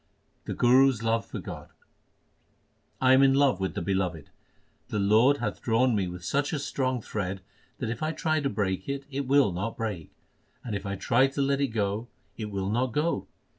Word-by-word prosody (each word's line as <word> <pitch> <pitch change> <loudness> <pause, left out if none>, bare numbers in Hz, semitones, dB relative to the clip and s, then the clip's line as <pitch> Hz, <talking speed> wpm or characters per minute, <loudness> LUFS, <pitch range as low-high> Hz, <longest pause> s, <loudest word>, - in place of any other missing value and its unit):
The - - -4
Guru 130 +2 +5
s 115 -4 -4
love 115 0 0
for - - -6
God: - - -8 1.3
I 130 0 +5
am 130 - +6
in 135 -1 +5
love 135 -8 +3
with 95 0 -2
the - - -2
Beloved. 90 -5 -2 0.6
The - - -3
Lord 110 +8 +4
hath - - -4
drawn 120 +1 +2
me 95 -3 0
with 90 0 -8
such 145 - 0
a - - 0
strong 130 -4 -2
thread 95 -2 -4 0.4
that 115 -3 -3
if 120 - -6
I 155 0 0
try 155 -1 0
to 140 -2 -1
break 95 -1 -2
it, 140 0 -3
it 140 0 -3
will 140 -5 +4
not 95 +6 -4
break; 105 -8 -4 0.5
and 110 -4 -4
if 100 0 -4
I 100 - -2
try 120 +7 +3
to 135 +1 -3
let 140 0 +1
it 140 - +2
go, 110 0 -2 0.3
it 105 0 -5
will 100 -1 -2
not 120 +2 0
go. 155 +5 0
115 Hz, 205 wpm, -27 LUFS, 100-135 Hz, 1.3 s, am